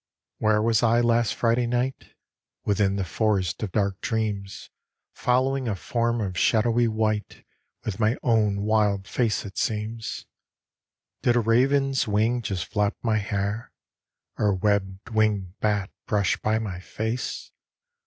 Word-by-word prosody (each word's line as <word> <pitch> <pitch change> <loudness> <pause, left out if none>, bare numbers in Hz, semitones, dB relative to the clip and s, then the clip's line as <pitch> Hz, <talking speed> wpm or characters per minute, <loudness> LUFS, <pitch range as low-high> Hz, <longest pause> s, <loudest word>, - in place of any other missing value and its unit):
Where 105 0 +3
was 115 -1 +3
I 115 0 +4
last 120 -2 +2
Friday 120 +1 +2
night? 125 +2 -2 0.5
Within 100 -1 +2
the 100 - -1
forest 95 0 0
of 105 -4 -3
dark 100 -2 0
dreams 105 -3 -3 0.4
Following 130 +1 +1
a 105 - 0
form 115 +3 -1
of 95 -3 -3
shadowy 115 +1 +3
white 110 -1 -2 0.4
With 105 -2 -3
my 110 +3 +2
own 105 -4 +2
wild 105 -2 +1
face 115 -4 0
it 100 - -6
seems. 110 0 -3 1.0
Did 120 - +3
a - - +4
raven's 135 +4 +2
wing 110 +4 +1
just 95 -7 -3
flap 105 +5 0
my 110 -2 +2
hair? 100 +2 -3 0.7
Or 105 - +2
a 100 - +3
web 95 -1 0
winged 105 -4 0
bat 105 -3 0 0.2
brush 100 -3 +2
by 110 0 0
my 100 -5 -4
face? 110 +6 -4
110 Hz, 140 wpm, -25 LUFS, 100-115 Hz, 1.0 s, I